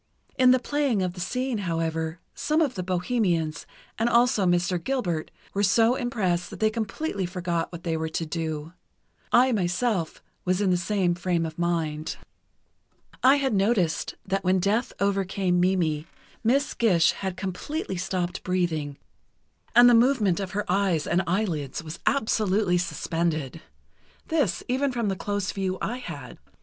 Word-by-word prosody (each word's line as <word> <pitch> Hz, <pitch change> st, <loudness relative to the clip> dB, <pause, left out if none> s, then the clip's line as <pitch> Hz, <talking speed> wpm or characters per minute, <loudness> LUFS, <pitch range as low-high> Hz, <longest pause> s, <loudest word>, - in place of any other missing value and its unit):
In 255 Hz, -1 st, +5 dB
the 255 Hz, -, +6 dB
playing 260 Hz, -5 st, 0 dB
of 180 Hz, -1 st, -2 dB
the 180 Hz, -, -10 dB
scene, 250 Hz, +5 st, -2 dB
however, 165 Hz, -2 st, -2 dB
some 305 Hz, +1 st, 0 dB
of 295 Hz, -6 st, +2 dB
the 185 Hz, -, -4 dB
bohemians, 180 Hz, -3 st, -1 dB, 0.3 s
and 230 Hz, +2 st, +2 dB
also 235 Hz, -4 st, +3 dB
Mr. 175 Hz, 0 st, +1 dB
Gilbert, 180 Hz, -13 st, -1 dB, 0.2 s
were 200 Hz, -, 0 dB
so 225 Hz, +4 st, +4 dB
impressed 195 Hz, -9 st, -1 dB
that -, -, -9 dB
they 215 Hz, 0 st, +3 dB
completely 215 Hz, -, -3 dB
forgot 175 Hz, -2 st, -2 dB
what 170 Hz, -1 st, -8 dB
they 165 Hz, -2 st, -1 dB
were 160 Hz, 0 st, -2 dB
to 165 Hz, +1 st, -2 dB
do. 160 Hz, 0 st, -4 dB, 0.6 s
I, 255 Hz, +2 st, +5 dB
myself, 185 Hz, -2 st, -1 dB, 0.2 s
was 185 Hz, 0 st, +1 dB
in 200 Hz, -2 st, +2 dB
the -, -, +4 dB
same 185 Hz, 0 st, +1 dB
frame 175 Hz, -1 st, 0 dB
of 160 Hz, +1 st, -7 dB
mind. 160 Hz, -3 st, -1 dB, 1.1 s
I 265 Hz, +2 st, +7 dB
had 270 Hz, -4 st, 0 dB
noticed 195 Hz, -5 st, +1 dB
that 195 Hz, 0 st, -1 dB
when 185 Hz, +1 st, +3 dB
death 205 Hz, +6 st, +1 dB
overcame 195 Hz, -2 st, +1 dB
Mimi, 170 Hz, -4 st, +1 dB, 0.4 s
Miss 270 Hz, +5 st, +2 dB
Gish 180 Hz, -8 st, +4 dB
had 190 Hz, -2 st, -5 dB
completely 195 Hz, -, -4 dB
stopped 180 Hz, -1 st, -2 dB
breathing 160 Hz, -6 st, -1 dB, 0.8 s
and 240 Hz, +1 st, +9 dB
the 245 Hz, -, +7 dB
movement 230 Hz, -6 st, +3 dB
of 190 Hz, -2 st, -4 dB
her 205 Hz, +1 st, -1 dB
eyes 180 Hz, -5 st, +1 dB
and 175 Hz, +2 st, +2 dB
eyelids 170 Hz, -7 st, -1 dB
was 160 Hz, +1 st, -7 dB
absolutely 210 Hz, -7 st, +2 dB
suspended. 165 Hz, -4 st, -2 dB, 0.7 s
This, 290 Hz, -, +1 dB
even 265 Hz, +2 st, +1 dB
from 235 Hz, -4 st, -1 dB
the 195 Hz, -, -1 dB
close 205 Hz, +1 st, -2 dB
view 190 Hz, -1 st, -2 dB
I 240 Hz, -, -2 dB
had. 255 Hz, -, -8 dB
185 Hz, 155 wpm, -26 LUFS, 170-225 Hz, 1.1 s, and